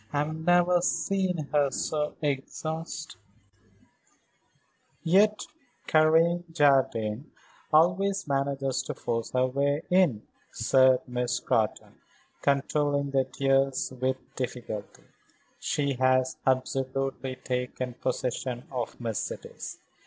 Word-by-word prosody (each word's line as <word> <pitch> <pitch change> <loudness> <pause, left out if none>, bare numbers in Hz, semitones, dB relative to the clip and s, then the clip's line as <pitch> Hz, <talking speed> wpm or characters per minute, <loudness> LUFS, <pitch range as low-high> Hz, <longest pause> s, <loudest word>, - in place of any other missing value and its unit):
I 145 - -2
have 150 +2 -1
never 175 +2 +3
seen 180 -4 0
her 145 -2 +4
so 150 +3 -2
exhausted." 155 +3 -4 1.8
"Yet 205 +5 +4 0.4
Karen 165 +2 +4
Jardine 135 -5 +2 0.4
always 180 +5 +3
manages 135 -1 0
to - - -4
force 115 -1 -2
her 130 0 +3
way 140 +4 0
in," 175 - +3 0.3
said 130 +2 +3
Miss 125 0 -1
Scrotton, - - -1 0.4
controlling 140 0 +1
the 135 -1 +2
tears 135 -1 +1
with 130 0 +1 0.2
difficulty. 120 -5 -5 0.6
"She 140 -1 0
has 130 0 +3
absolutely 130 0 -1
taken 125 0 -3
possession 125 0 -3
of 125 -3 -4
Mercedes. 115 -4 -5
135 Hz, 95 wpm, -28 LUFS, 130-155 Hz, 1.8 s, her